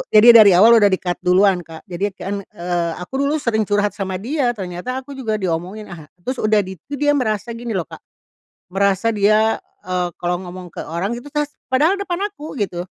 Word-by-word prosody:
jadi 215 +2 +8
dari 215 -4 +8
awal 225 +5 +7
udah 205 - +5
di-cut 180 -2 -1
duluan 185 +1 +3
Kak. 160 -1 -11
Jadi 185 +4 -1
kan, 200 +1 -4 0.2
eee, 175 -2 -1
aku 180 +10 -5
dulu 280 +2 +1
sering 220 -7 0
curhat 205 0 +1
sama 190 -1 -4
dia 240 +5 -1
ternyata 185 +5 -5
aku 275 +2 -12
juga 240 -6 -3
diomongin, 190 +2 -4
ah, 160 -4 -10 0.2
terus 255 +3 -3
udah 215 -1 +3
di 190 -2 -9
itu 285 - -7
dia 290 +1 +2
merasa 235 -5 -1
gini 230 -1 -5
loh 180 - 0
Kak, - - -12 0.7
merasa 195 +3 +1
dia, 215 +1 +3 0.2
eee, 180 -1 -2
kalau 175 0 0
ngomong 180 0 -9
ke - - -7
orang 190 +8 -3
gitu 245 - -10
tas 295 -1 0 0.2
padahal 305 +10 +2
depan 380 -2 -3
aku 310 -6 -9
gitu, 180 -3 -3
205 Hz, 200 wpm, -20 LUFS, 180-240 Hz, 0.7 s, jadi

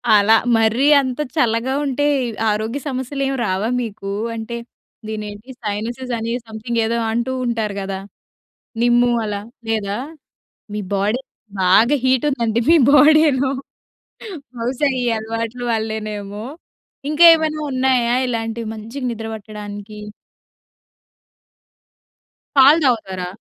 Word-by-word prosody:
అలా 210 +2 +5 0.2
మరీ 225 +5 +2 0.2
అంత 260 0 -4 0.2
చల్లగా 240 -1 +1
ఉంటే, 280 +1 0 0.4
ఆరోగ్య 220 +5 -1
సమస్యలేమి 270 +1 -2
రావా 190 +4 -1
మీకూ? 200 -4 -5 0.2
అంటే, 225 +1 -5 0.5
దినేంటి, 215 +2 -7
సైనసెస్ 235 +5 -4
అని 225 +1 -3
సమ్‌థింగేదో 225 +1 -2
అంటూ 235 +3 -1
ఉంటారు 220 -4 -2
గదా! 195 0 -4 0.8
నిమ్ము 240 0 +4
అలా, 205 -1 -3 0.3
లేదా? 210 -2 -1 0.8
మీ 210 - -2
బాడీ 210 +6 0 0.4
బాగా 215 +9 +5
హీటుందండి 255 -3 +1
మీ 335 - +7 0.2
బాడీలో. 295 -3 +5 1.1
బహుశా 250 +5 0
ఈ - - -1
అలవాట్లు 230 +2 -4
వల్లేనేమో. 215 -2 -4 0.7
ఇంకా 320 +3 +5
ఏమైనా 310 -1 -1
ఉన్నాయా, 255 -2 +2
ఇలాంటివి 225 -1 -3
మంచిగ 225 +6 -8
నిద్ర 225 -1 -5
పట్టడానికి? 210 0 -8 2.6
పాలు 280 +4 +7
తాగుతారా? 190 -7 0
230 Hz, 100 wpm, -19 LUFS, 215-260 Hz, 2.6 s, మీ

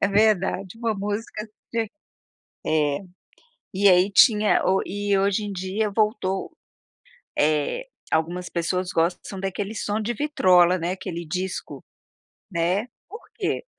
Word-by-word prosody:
é - - +4
verdade, 200 -1 +1
uma 230 -2 0
música 210 +2 -4 0.3
ti 225 -3 -1 0.7
é. 150 -2 +1 0.7
E 200 +2 +3
aí 185 +2 +5
tinha 210 0 +5
o 190 +1 +3
e 205 +1 -1
hoje 200 +2 +1
em 205 -1 -4
dia 195 +3 -2
voltou, 210 -3 0 0.9
eh, 155 - +1 0.2
algumas 175 +3 -1
pessoas 180 +2 -1
gostam 170 +2 +1
são 195 - -7
daquele 195 +2 -3
som 210 0 -2
de 230 +3 -2
vitrola, 185 - +4
né, 170 +2 -1
aquele 175 -3 -5
disco, 180 +4 -4 0.7
né. 180 +6 +1 0.2
Por 435 +7 -10
quê? - - -2
195 Hz, 130 wpm, -24 LUFS, 180-210 Hz, 0.9 s, aí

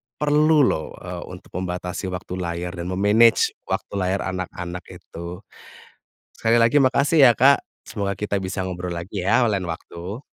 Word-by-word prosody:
perlu 150 +1 +4
loh, 80 -11 -1
eee, - - -7
untuk - - -12
membatasi 90 +1 -4
waktu 90 0 -6
layar 85 0 -3
dan 85 -1 -6
me-manage 105 +5 +4 0.2
waktu - - -3
layar 95 +1 0
anak-anak 90 -1 -5
itu. 85 +3 -9 0.9
Sekali 115 +1 +2
lagi 115 +4 +3
makasih 140 +3 +4
ya 120 - +9
Kak, 140 +3 +5 0.2
semoga 100 -2 -2
kita 105 -1 -2
bisa 95 +1 -4
ngobrol 90 -1 -5
lagi 90 +3 -5
ya 115 +5 +3
lain 100 -3 0
waktu. 85 - -7
95 Hz, 150 wpm, -23 LUFS, 90-115 Hz, 0.9 s, ya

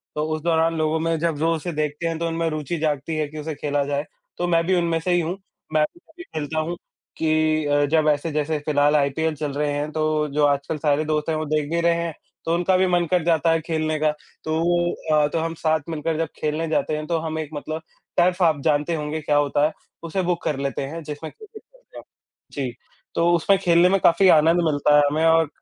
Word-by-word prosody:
तो 150 - -1
उस 155 - -6
दौरान 165 0 +2
लोगों 155 0 +1
में 165 0 0
जब 165 -2 0
जो 165 +3 +1
उसे 165 +3 -4
देखते 150 +2 -2
हैं 165 - -2
तो 170 - -1
उनमें 165 0 -1
रुचि 155 +2 -3
जागती 155 0 -1
है 155 -1 0
कि 155 - -11
उसे 150 0 -5
खेला 145 0 -1
जाए, 145 +1 -2 0.3
तो 175 - -1
मैं 165 -1 +3
भी 185 +1 +2
उनमें 170 -1 +1
से 180 +2 -2
ही 175 - +3
हूँ। 170 +4 -3 0.4
मैं 155 0 +4
भी 345 - -20
तभी 335 +1 -14
खेलता 155 - -4
हूँ 165 +2 -2 0.4
कि 155 -1 +1
अ, 145 0 +2
जब 155 +1 +2
ऐसे 150 +2 0
जैसे 150 +1 -1
फ़िलहाल 145 0 +3
आईपीएल 150 +2 +1
चल 150 -1 -3
रहे 145 +1 -1
हैं 145 +1 -2
तो 155 -1 0
जो 150 0 +3
आजकल 145 +2 0
सारे 150 +1 +1
दोस्त 150 0 -1
हैं 160 - +1
वो 155 - -2
देख 150 -1 -1
भी 170 0 +1
रहे 170 0 +3
हैं, 170 -1 -2 0.3
तो 165 - +1
उनका 175 +2 +2
भी 185 - +3
मन 175 -1 +2
कर 180 -2 +2
जाता 165 -1 +2
है 165 0 +1
खेलने 155 -1 -1
का। 155 - +4 0.3
तो 160 +1 -1 0.5
अ, 150 -1 +4
तो 165 - -2
हम 165 0 -2
साथ 160 0 +3
मिलकर 160 0 -2
जब 165 0 0
खेलने 155 +2 -1
जाते 155 - 0
हैं 155 - -5
तो 170 - 0
हम 160 0 -4
एक 155 -2 -4
मतलब 155 +2 -5 0.4
टर्फ 180 +1 +3
आप 160 -4 +3
जानते 150 +3 +1
होंगे 150 0 -3
क्या 150 0 0
होता 145 0 +2
है, 155 - -1 0.3
उसे 170 +3 -2
बुक 175 - -3
कर 150 - -1
लेते 140 0 -2
हैं 165 +4 -6
जिसमें 150 +1 -7
क्रिकेट 430 0 -14
खेलते - - -19
हैं। - - -9 0.5
जी, 135 -3 -3 0.4
तो 170 +1 +3
उसमें 195 +4 +3
खेलने 175 -1 +4
में 195 +1 +3
काफ़ी 175 +3 +5
आनंद 165 +2 +5
मिलता 150 -1 +3
है - - +7
हमें 155 +3 +1
और 165 -1 +4
155 Hz, 240 wpm, -23 LUFS, 150-165 Hz, 0.5 s, है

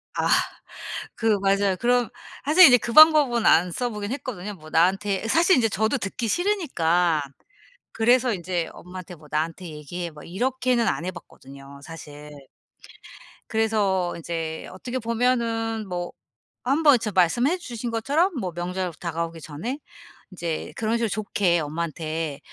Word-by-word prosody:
아. - - 0 0.9
그 220 -2 +2
맞아요. 195 0 +2
그럼 245 +1 +2 0.4
사실 330 +5 +8
이제 250 -2 +7
그 235 - -5
방법은 300 -6 +7
안 175 +2 +5
써보긴 210 0 -3
했거든요. 210 -8 -6
뭐 155 -3 -14
나한테 195 +5 +1
사실 340 +9 +4
인제 225 -3 +2
저도 220 +6 0
듣기 230 +1 -4
싫으니까 180 - +1 0.7
그래서 240 +2 +3
인제 175 -3 -2
엄마한테 180 0 -10
뭐 155 -1 -17
"나한테 165 +4 -2
얘기해." 165 +3 -6
뭐 150 -2 -13
이렇게는 250 +4 0
안 170 - -1
해 185 - -2
봤거든요 140 -5 -13
사실. 150 -3 -11 1.0
그래서 205 -5 +1
인제 165 -1 -5
어떻게 245 +7 -5
보면은 230 -2 -1
뭐 175 -1 -4 0.5
한번 285 +1 +4
저 215 -2 -3
말씀해 240 - +2
주신 240 -8 -6
것처럼 290 - +1
뭐 185 -5 -3
명절 180 +1 -3
다가오기 165 -1 -4
전에 195 - -5 0.5
인제 170 -3 -4
그런 225 0 -1
식으로 230 -1 -1
좋게 195 -4 0
엄마한테 155 -1 -4
195 Hz, 300 characters per minute, -24 LUFS, 170-240 Hz, 1.0 s, 사실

